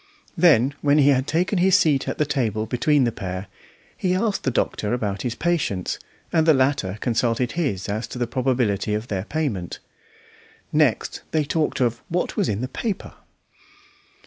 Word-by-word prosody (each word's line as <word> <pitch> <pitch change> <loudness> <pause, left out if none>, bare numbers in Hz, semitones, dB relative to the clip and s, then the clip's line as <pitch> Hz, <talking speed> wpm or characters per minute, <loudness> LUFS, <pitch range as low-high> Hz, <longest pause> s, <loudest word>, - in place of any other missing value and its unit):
Then, 145 -7 +4
when 145 0 +3
he 145 -1 +5
had 130 0 +2
taken 180 +4 +1
his 190 +1 +5
seat 145 -4 +2
at - - -3
the 150 - +2
table 110 -7 -1
between 140 +4 +2
the 120 - +1
pair, 95 -3 -5 0.5
he 180 -1 0
asked 205 +1 0
the - - +3
doctor 105 -3 -1
about 100 -5 -3
his 120 -2 -2
patients, 155 - -1 0.3
and 160 -1 +3
the 160 - +7
latter 130 -8 +1
consulted 120 0 0
his 135 - -2
as 110 +3 -3
to - - -8
the 120 - 0
probability 120 -5 0
of 110 +3 -4
their 95 -1 -2
payment. 120 - -3 1.0
Next - - +1
they 155 -1 +1
talked 150 -1 -1
of 120 -2 +1
"what 180 +2 -1
was - - +1
in 105 +1 -1
the 130 - -2
paper." 200 - -4
130 Hz, 170 wpm, -23 LUFS, 110-155 Hz, 1.0 s, the